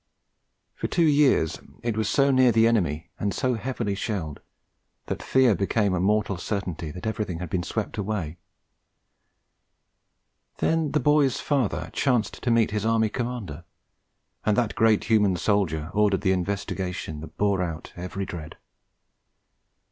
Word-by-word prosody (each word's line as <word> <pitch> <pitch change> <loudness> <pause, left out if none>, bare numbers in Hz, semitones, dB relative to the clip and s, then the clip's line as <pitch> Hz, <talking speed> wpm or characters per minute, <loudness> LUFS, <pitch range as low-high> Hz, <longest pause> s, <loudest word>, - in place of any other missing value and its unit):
For - - -3
two 170 - +2
years 145 - +3 0.2
it 115 -2 -1
was 110 -1 0
so 140 0 +3
near 130 -2 +5
the 115 0 +4
enemy 85 -10 0
and 100 - 0
so 130 -1 +1
heavily 120 -3 -2
shelled 95 -8 -3 0.7
that - - -3
the - - -9
fear 130 -4 +4
became 100 +1 +1
a 90 - 0
moral 100 +1 +1
certainty 90 -4 -4
that 90 +4 -8
everything 105 -5 -2
had 85 -2 -6
been 90 - 0
swept 110 +4 -4
away; 95 -6 -3 2.2
then 160 -2 +1
the 150 - +3
boy's 145 -3 +3
father 135 -8 -1
chanced 120 -7 0
to 125 - -1
meet 115 -2 +3
his 105 -1 -1
Army 110 -1 +2
Commander; 115 - -4 0.8
and 105 -1 +2
that 120 -4 +1
great 110 -2 +3
human 105 -4 +3
soldier 85 -5 0
ordered 105 -2 +2
the 95 -2 +2
investigation 90 -3 -3
that 80 +1 -11
bore 100 -2 +2
out 85 -3 -5
every 90 +2 -4
dread. 80 -3 -8
105 Hz, 150 wpm, -25 LUFS, 90-115 Hz, 2.2 s, near